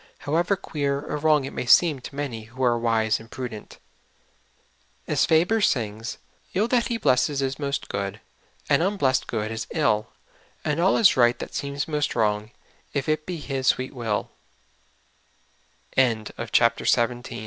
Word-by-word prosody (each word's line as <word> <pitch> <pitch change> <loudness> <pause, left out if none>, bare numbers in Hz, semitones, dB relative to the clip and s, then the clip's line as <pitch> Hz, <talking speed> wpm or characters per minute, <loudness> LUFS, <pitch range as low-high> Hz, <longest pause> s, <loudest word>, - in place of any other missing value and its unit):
ever 170 +6 +2
queer 145 -7 -2
or 145 - -5
wrong 150 -2 +3
it - - -7
may 125 - -4
seem 155 +2 +5
to 135 - -10
many 125 -7 -4
who 130 +3 -6
are 120 -1 +3
wise 110 -2 +1
and 115 0 -14
prudent. 120 -4 -7 1.3
As - - +2
Faber 175 +8 +3
sings: 115 - 0 0.2
" - - -34
111 210 +5 +1
that 240 -2 +2
He 235 - -1
blesses 140 - +2
is 135 +1 -2
most 140 -1 -2
good, 100 +1 -4 0.5
And - - +3
unblest 175 -9 +1
good 110 -1 -3
is 110 +1 -4
ill, 110 -9 +1 0.6
And 150 +1 0
all 185 +3 +3
is 220 - +6
right 120 -1 +4
that - - -7
seems 140 0 -3
most 150 -2 -1
wrong, 105 -1 0 0.4
If 140 -3 -2
it 155 0 -1
be 180 -2 -3
His 135 -3 -3
swee 130 0 +2
140 Hz, 150 wpm, -24 LUFS, 115-155 Hz, 1.3 s, is